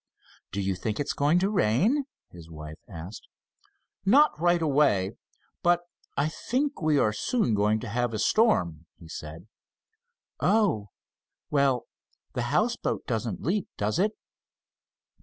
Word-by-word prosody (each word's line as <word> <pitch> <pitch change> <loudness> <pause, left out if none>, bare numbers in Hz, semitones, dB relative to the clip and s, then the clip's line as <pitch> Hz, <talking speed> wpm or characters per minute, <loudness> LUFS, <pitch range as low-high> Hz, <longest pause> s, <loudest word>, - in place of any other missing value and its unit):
"Do 100 - -2
you 95 0 0
think 105 +3 -3
it's 145 - -1
going 145 +4 +3
to 190 +2 +2
rain?" 205 - +2 0.3
his 85 -2 -12
wife 75 -1 -9
asked. 90 +3 -9 0.8
"Not 275 +10 +6
right 175 0 +4
away, 135 -11 +3 0.5
but 175 0 +3 0.4
I 140 +2 +2
think 270 - -2
we 155 -2 +3
are 110 -6 +3
soon 120 - 0
going 105 +1 +2
to 125 - -6
have 120 +3 -1
a 110 - -3
storm," 90 - +2
he 85 - -14
said. 80 +2 -8 0.9
"Oh, 185 - +2 0.6
well, 140 -4 +2 0.5
the - - -1
houseboat - - 0
doesn't 110 -3 -3
leak, 190 +5 0
does 105 +9 0
it?" 210 +3 +2
125 Hz, 135 wpm, -27 LUFS, -, 0.9 s, Not